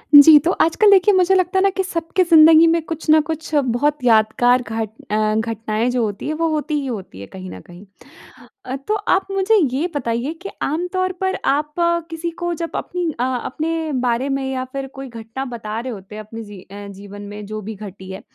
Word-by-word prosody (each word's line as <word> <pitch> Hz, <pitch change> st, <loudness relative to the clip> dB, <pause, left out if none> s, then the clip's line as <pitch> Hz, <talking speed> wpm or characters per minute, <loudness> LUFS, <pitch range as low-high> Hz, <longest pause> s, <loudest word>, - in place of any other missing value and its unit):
जी, 300 Hz, +2 st, +10 dB
तो 330 Hz, +5 st, 0 dB
आजकल 405 Hz, +6 st, +4 dB
देखिए 395 Hz, +1 st, +5 dB
मुझे 375 Hz, 0 st, +4 dB
लगता 370 Hz, 0 st, +1 dB
है -, -, +2 dB
ना 395 Hz, -, +4 dB
कि 385 Hz, -, +1 dB
सबकी 340 Hz, 0 st, -1 dB
ज़िंदगी 325 Hz, -1 st, +7 dB
में 335 Hz, 0 st, +2 dB
कुछ 325 Hz, -1 st, -6 dB
ना 310 Hz, 0 st, +7 dB
कुछ 320 Hz, 0 st, -5 dB
बहुत 285 Hz, +1 st, +1 dB
यादगार 240 Hz, +2 st, +3 dB
घट 225 Hz, -2 st, -4 dB, 0.2 s
अ, 215 Hz, 0 st, +1 dB
घटनाएँ 225 Hz, +1 st, -1 dB
जो 245 Hz, -1 st, 0 dB
होती 205 Hz, +2 st, -4 dB
हैं 305 Hz, -, -1 dB
वो 330 Hz, +1 st, 0 dB
होती 305 Hz, 0 st, -2 dB
ही -, -, -5 dB
होती 195 Hz, -, -6 dB
है 100 Hz, -, -9 dB
कहीं 95 Hz, -1 st, -9 dB
न 95 Hz, -, -9 dB
कहीं। 175 Hz, -, -14 dB, 0.8 s
अ, 255 Hz, -, -4 dB
तो 425 Hz, -, +1 dB
आप 400 Hz, -2 st, 0 dB
मुझे 390 Hz, +3 st, +2 dB, 0.2 s
ये 310 Hz, +6 st, 0 dB
बताइए 245 Hz, +2 st, -2 dB
कि 395 Hz, -, -6 dB
आम 325 Hz, +5 st, -1 dB
तौर 370 Hz, 0 st, 0 dB
पर 380 Hz, 0 st, 0 dB
आप 300 Hz, +2 st, 0 dB, 0.4 s
किसी 330 Hz, +1 st, -4 dB
को 345 Hz, -, 0 dB
जब 335 Hz, 0 st, -5 dB
अपनी 350 Hz, -3 st, -2 dB
अ, -, -, +1 dB
अपने 310 Hz, +6 st, -2 dB, 0.2 s
बारे 245 Hz, +3 st, 0 dB
में 275 Hz, 0 st, -1 dB
या 260 Hz, -1 st, -3 dB
फिर 275 Hz, 0 st, -4 dB
कोई 270 Hz, 0 st, -7 dB
घटना 230 Hz, +3 st, -7 dB
बता 225 Hz, -3 st, -5 dB
रहे 245 Hz, 0 st, -5 dB
होते 195 Hz, +1 st, -10 dB
अपने 215 Hz, +1 st, -8 dB
ज़ी 205 Hz, -3 st, -11 dB
अ, 200 Hz, +1 st, -10 dB
जीवन 200 Hz, +1 st, -10 dB
में 205 Hz, +1 st, -8 dB
जो 215 Hz, +1 st, -6 dB
भी 215 Hz, +2 st, -7 dB
घटी 190 Hz, -2 st, -10 dB
है। 190 Hz, -, -7 dB
265 Hz, 215 wpm, -20 LUFS, 215-330 Hz, 0.8 s, जी